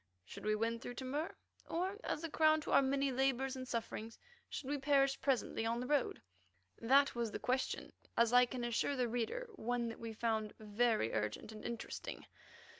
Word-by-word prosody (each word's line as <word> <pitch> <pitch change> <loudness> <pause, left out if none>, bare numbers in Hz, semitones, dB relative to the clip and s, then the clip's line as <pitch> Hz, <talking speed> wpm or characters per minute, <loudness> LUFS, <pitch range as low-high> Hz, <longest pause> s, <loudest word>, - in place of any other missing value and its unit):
Should - - -9
we 215 0 +3
win 230 +2 0
through 245 - -6
to 260 - -5
Mur? 295 +7 -2 0.3
Or, 375 +5 -1
as 305 - -2
a 330 - -2
crown 310 0 +5
to - - -5
our - - +7
many 275 0 +1
labours 265 0 +1
and 255 0 -6
sufferings, 230 -1 -4 0.3
should 265 - -5
we 290 +1 -1
perish 275 -1 +3
presently 265 -4 +1
on 230 +1 0
the 250 - -3
road? 280 - +1 0.6
That 275 +5 +5
was 235 -2 -1
the - - -4
question; 255 +1 -1 0.2
as 235 0 +4
I 250 0 +7
can 245 0 -4
assure 240 +4 +1
the 250 -2 +1
reader, 245 - -2
one 240 0 -1
that 225 - -8
we 230 -1 -5
found 220 -1 -1
very 215 - +1
urgent 105 - -2
and 215 -1 -9
interesting. 235 -1 -5
245 Hz, 190 wpm, -37 LUFS, 230-275 Hz, 0.6 s, our